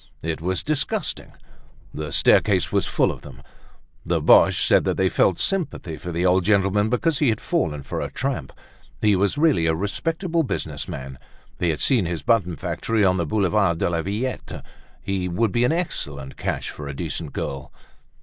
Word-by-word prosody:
It 80 -1 -3
was 90 +1 -1
disgusting. 150 -2 -2 0.6
The 75 +1 -5
staircase - - +3
was - - +1
full - - +2
of - - -9
them. 65 -2 -12 0.6
The - - 0
Boches - - +5
said - - +4
that - - 0
they 95 -1 +2
felt 95 - +2
sympathy 170 - -2
for 90 +3 -6
the 85 +2 -1
old 90 0 +3
gentleman 100 +1 +2
because 150 +5 +1
he 145 - +3
had 110 -1 0
fallen 80 - -1
for - - -4
a - - -3
tramp. 130 - -3 0.5
He 105 -2 +3
was 100 +7 +1
really 145 - +3
a 80 - +2
respectable 165 - -1
businessman, 65 - -5 0.4
they 85 - +1
had 80 - -1
seen 120 -10 +3
his 85 -2 -4
button 105 -8 +2
factory 110 +6 -1
on 95 0 +3
the 85 -3 -1
Boulevard 100 -2 +2
de 85 - 0
la 85 -1 0
Villette. 105 +8 -4 0.4
He 95 -2 -2
would 100 +5 0
be 120 +5 +2
an 125 - +2
excellent 70 - -3
catch - - -3
for 75 - -8
a 70 - -6
decent 80 0 -4
girl. 65 -1 -5
95 Hz, 180 wpm, -23 LUFS, 80-120 Hz, 0.6 s, Boches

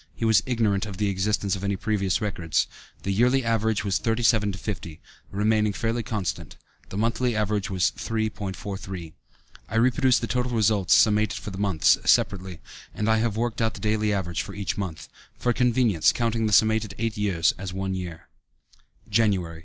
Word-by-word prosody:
He 115 - -2
was 110 -2 +5
ignorant 110 -5 +1
of 100 -3 -7
the 105 -1 0
existence 100 0 0
of 95 - -7
any 100 0 0
previous 100 -1 -1
records. 85 -7 0 0.4
The 100 - -1
yearly 125 +4 +3
average 110 -2 0
was 95 -6 +1
37 115 -1 +2
to - - -7
50, 90 -5 -6 0.3
remaining 105 +1 +1
fairly 115 +3 -1
constant; 105 -5 -4 0.3
the 95 - -6
monthly 115 +2 0
average 105 0 -1
was 95 -3 +1
3.43. 95 -5 -4 0.6
I - - -5
reproduce 130 +2 +3
the - - -2
total 125 +1 -1
results 105 -4 +3
summated 105 -1 +3
for 105 - -6
the 95 - -7
months, 90 -7 +3
separately, 95 -3 +1 0.3
and 105 - -2
I 110 0 +4
have 110 -1 0
worked 120 0 -1
out 110 -1 0
the - - -8
daily 105 -1 0
average 90 -4 -1
for - - -8
each 100 -4 -2
month, 80 -6 -5 0.3
for 120 - +1
convenience 120 -8 +3
counting 115 -2 0
the - - -1
summated 110 -1 +3
eight 115 0 -2
years 95 -6 +1
as 95 -1 -5
one 95 0 -3
year: 90 -3 -6 0.8
Jan. 95 -7 +1
105 Hz, 175 wpm, -25 LUFS, 95-115 Hz, 0.8 s, was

